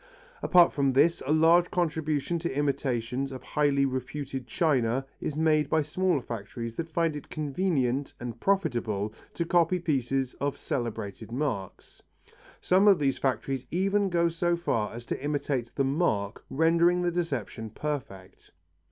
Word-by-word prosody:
Apart 175 -2 +5
from 140 -2 +1
this, 165 +6 +3
a - - +1
large 165 +3 +5
contribution 160 -2 -1
to 170 +1 -2
imitations 135 -2 -1
of 130 -1 -8
highly 140 -1 +2
reputed 135 0 -4
china 130 -4 +1
is 150 - -3
made 155 -2 +2
by 160 -1 +2
smaller 165 -1 0
factories 115 +1 -6
that 165 +5 -5
find 165 -1 0
it 145 - -8
convenient 145 -4 -1
and 120 -2 -6
profitable 120 - 0 0.2
to 170 - -1
copy 175 +1 +3
pieces 135 -5 -1
of 140 0 -1
celebrated 110 -3 -4
marks. 120 -8 -4 0.6
Some 190 +3 +3
of 200 -3 +7
these 135 -2 0
factories 135 -1 -1
even 195 +3 +1
go 170 -1 +2
so 170 +1 0
far 115 -11 -1
as 120 0 -8
to - - -4
imitate 140 -5 -1
the 135 - +1
mark, 130 - 0
rendering 170 +3 +3
the 175 - +1
deception 135 - -3
perfect. 110 -8 -6
145 Hz, 145 wpm, -28 LUFS, 125-170 Hz, 0.6 s, of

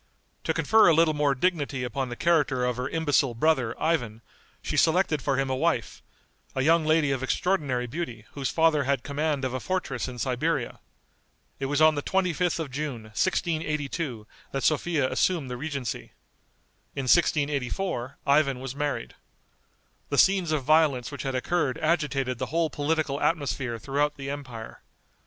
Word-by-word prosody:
To - - +1
confer 220 0 +5
a 165 - +6
little 165 -1 +4
more 145 -2 +1
dignity 145 -4 0
upon 125 +2 -3
the 120 - -5
character 145 -6 +2
of 125 -1 -1
her 125 +2 -2
imbecile 145 -6 +1
brother, 130 -3 +1
Ivan, 120 -9 -1 0.4
she - - -3
selected 160 -3 +3
for 135 -1 0
him 135 0 +1
a 130 - -1
wife, - - -1 0.5
a 130 - 0
young 165 +2 +4
lady 155 -2 +3
of 135 -2 -1
extraordinary 135 -4 0
beauty 120 -5 -5
whose 140 -2 -3
father 160 -3 +3
had 135 -2 0
command 145 -1 -1
of 130 - -2
a 130 - -2
fortress 155 -7 -2
in 125 -1 -7
Siberia. 125 0 -1 0.8
It 135 - -2
was 145 +2 +2
on 155 0 +7
the 145 - -2
25th 180 0 0
of 160 -5 -4
June, 135 -4 -4
1682, 155 - -1 0.3
that 135 - -3
Sophia 155 -2 +1
assumed 155 -3 0
the - - -3
regency. 140 -3 -5 0.8
In 135 - -2
1684 140 -1 +1
Ivan 140 -2 +3
was 135 0 -6
married. 145 - -3 1.0
The - - -1
scenes 190 -4 +4
of 150 -3 0
violence 145 -3 +3
which 140 - -6
had 135 -1 -3
occurred 135 0 0
agitated 140 -6 0
the - - -2
whole 165 -1 0
political 145 0 -1
atmosphere 135 -6 -1
throughout 145 +5 -1
the 135 0 -5
empire. 125 -6 -8
145 Hz, 160 wpm, -26 LUFS, 130-160 Hz, 1.0 s, on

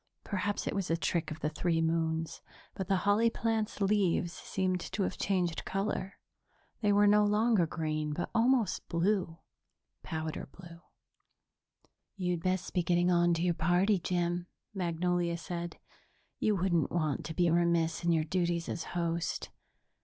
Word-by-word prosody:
Perhaps 205 0 -2
it - - -1
was 195 -2 -2
a 165 - +2
trick 170 0 -1
of 155 - -7
the 150 - 0
three 165 +2 0
moons, 160 0 -1 0.3
but 190 - -4
the 195 - +3
holly 210 +3 +4
plant's 225 -2 -1
leaves 195 -4 +2
seemed 185 -1 -1
to 200 +3 -3
have 185 - -2
changed 180 -4 0
color.. 195 0 -2 0.6
They 210 -2 +3
were 205 +1 +5
no 210 +1 +5
longer 210 -3 +3
green, 155 -2 -2
but 175 +4 -3
almost 240 -1 +2
blue 175 -1 0 0.6
powder 160 -3 -4
blue. 170 -2 -12 1.4
"You'd 180 -3 -1
best 185 0 -1
be 180 - +2
getting 175 +1 +2
on 175 -1 +4
to 165 - -1
your 180 -1 +2
party, 175 +5 +2
Jim," 175 0 -1 0.3
Magnolia 175 -1 0
said. 170 0 -5 0.6
"You 215 - +2
wouldn't 180 -3 +1
want 155 -5 0
to 160 - -5
be 175 -2 +3
remiss 170 -1 +2
in 170 - +3
your 160 -2 +3
duties 170 0 -1
as 170 - -3
host. 170 -1 -2
175 Hz, 155 wpm, -31 LUFS, 165-195 Hz, 1.4 s, were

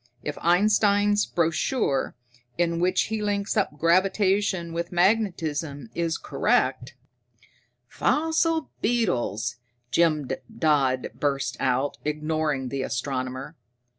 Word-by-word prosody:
If 150 - -3
Einstein's 205 +3 +3
brochure, 165 - 0 0.4
in 170 -1 +1
which 185 +1 +2
he 220 0 -3
links 205 0 -1
up 195 -8 0
gravitation 185 +1 +2
with 170 +1 -3
magnetism, 170 - 0
is 165 -1 -1
correct 130 -2 0 0.5
" 120 0 -35
"Fossil 320 +2 +1
beetles!" 120 - 0 0.3
Jim 155 -5 +2 0.3
Dodd 135 -5 +2
burst 140 -3 -1
out, 130 +2 0
ignoring 150 -3 -1
the 135 0 -3
astronomer. 130 +2 -3
165 Hz, 100 wpm, -25 LUFS, 135-200 Hz, 0.5 s, Einstein's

